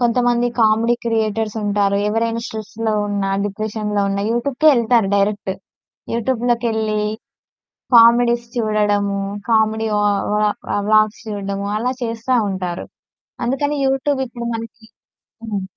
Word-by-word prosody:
కొంతమంది 245 0 +2
comedy 225 +2 +3
creators 220 -1 -1
ఉంటారు 200 -1 +1
ఎవరైనా 230 +2 0
స్ట్రెస్‌లో 220 0 -4
ఉన్నా, 200 -1 -1 0.2
డిప్రెషన్‌లో 210 0 -2
ఉన్నా, 200 0 -1
యూట్యూబ్‌కే 250 +6 +2
ఎళ్తారు 230 -3 +2
డైరెక్ట్. 200 -1 0 0.6
యూట్యూబ్‌లోకెళ్లి 230 -2 0 1.0
కామెడీస్ 235 +1 +5
చూడడము, 205 -3 +1 0.3
కామెడీ 220 0 +2
వా 205 - +1 0.3
వ్లా 210 0 +2 0.2
వ్లా - - 0
వ్లాగ్స్ 215 0 +3
చూడడము, 200 -1 -4
అలా 250 +4 -1
చేస్తా 230 +2 -1
ఉంటారు. 180 -2 -4 0.6
అందుకని 285 +4 0
యూట్యూబ్ 270 +1 0
ఇప్పుడు 235 -1 -7
మనకి 225 0 -8 0.6
హ్మ్. 205 -3 -3
220 Hz, 110 wpm, -19 LUFS, 210-235 Hz, 1.0 s, కామెడీస్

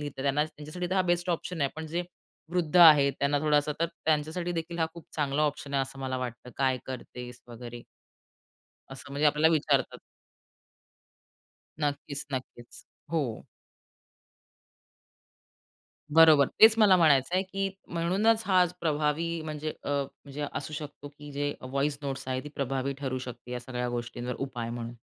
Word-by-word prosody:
लिहता, 145 -2 -5
त्यांना 140 +2 +2
त्यांच्यासाठी 155 +3 -6
तर - - +1
हा 190 - +3
बेस्ट 175 +1 -1
ऑप्शन 170 0 -3
आहे. 140 -1 +1
पण 160 - -5
जे 170 +3 -2 0.5
वृद्ध 175 -1 0
आहेत 150 -5 +8
त्यांना 140 +1 +2
थोडासा 150 -1 +2
तर, 170 - +3 0.2
त्यांच्यासाठी 160 +3 0
देखील 170 0 -4
हा 160 - +2
खूप 170 - -11
चांगला 145 0 +1
ऑप्शन 145 -1 -2
आहे 135 - +3
असं 135 +1 -8
मला 130 -1 -3
वाटतं. 125 0 -6
"काय 130 -2 +1
करतेस 125 -1 -8
वगैरे.?" 120 0 -9 1.1
असं 135 - -10
म्हणजे 145 +2 +2
आपल्याला 150 +2 +4
विचारतात. 145 -4 +1 1.8
नक्कीच, 145 -1 -2
नक्कीच. 125 -2 -5 0.5
हो. 140 -9 -2 2.7
बरोबर. 160 -4 +8
तेच 220 0 +9
मला 205 -4 +7
म्हणायचंय, 160 +2 +4
की 195 +1 -2 0.2
म्हणूनच 195 +7 +2
हा 185 -2 +5 0.2
प्रभावी 160 +1 0
म्हणजे 155 0 -4
अ, - - -4
म्हणजे 140 +1 -4
असू 150 - -5
शकतो, 145 -1 -7
की 145 0 -12
जे 145 +1 -1
व्हॉईस 140 +2 -1
नोट्स 135 -2 -4
आहेत, 130 0 -1
ती 150 - -6
प्रभावी 135 0 -1
ठरू 130 -2 -2
शकते 125 -1 -8
या 125 - -3
सगळ्या 125 0 -4
गोष्टींवर 120 +1 -4
उपाय 120 -4 -4
म्हणून. 120 0 -5
145 Hz, 150 wpm, -28 LUFS, 130-160 Hz, 2.7 s, तेच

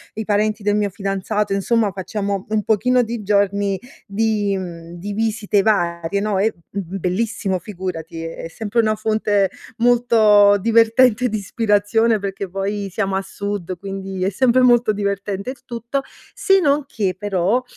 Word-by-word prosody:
i 220 - -4
parenti 210 +1 0
del 205 0 +2
mio 210 -1 +1
fidanzato, 200 +1 -2
insomma, 210 +2 +1
facciamo 195 +1 -3
un 215 -1 0
pochino 250 +4 +2
di 235 -2 -4
giorni 200 -1 +1 0.3
di 210 -1 0
mhmm, 170 -2 -8
di 205 +4 -5
visite 215 -1 +1
varie, 175 -3 0
no, 205 -1 0
è, 215 +3 +2 0.2
mhmm,bellissimo, 190 +1 -2
figurati, 170 -5 -6
è 165 0 -6
sempre 220 +6 -1
una 215 -1 +1
fonte 215 -2 +1 0.3
molto 225 -4 +5
divertente 230 +3 +4
di 215 - -2
ispirazione 210 +2 +1
perché, 195 -1 -4
poi, 195 +2 -3
siamo 195 0 -1
a 190 - 0
sud, 195 -2 -5
quindi 195 -1 -5
è 190 - +2
sempre 255 +5 +3
molto 240 -3 +4
divertente 200 0 -3
il 265 - -14
tutto. 235 +3 -3 0.3
Se 390 -1 +3
non 295 -3 +2
che, 200 -8 -2
però, 205 +4 0
205 Hz, 150 wpm, -20 LUFS, 195-225 Hz, 0.3 s, molto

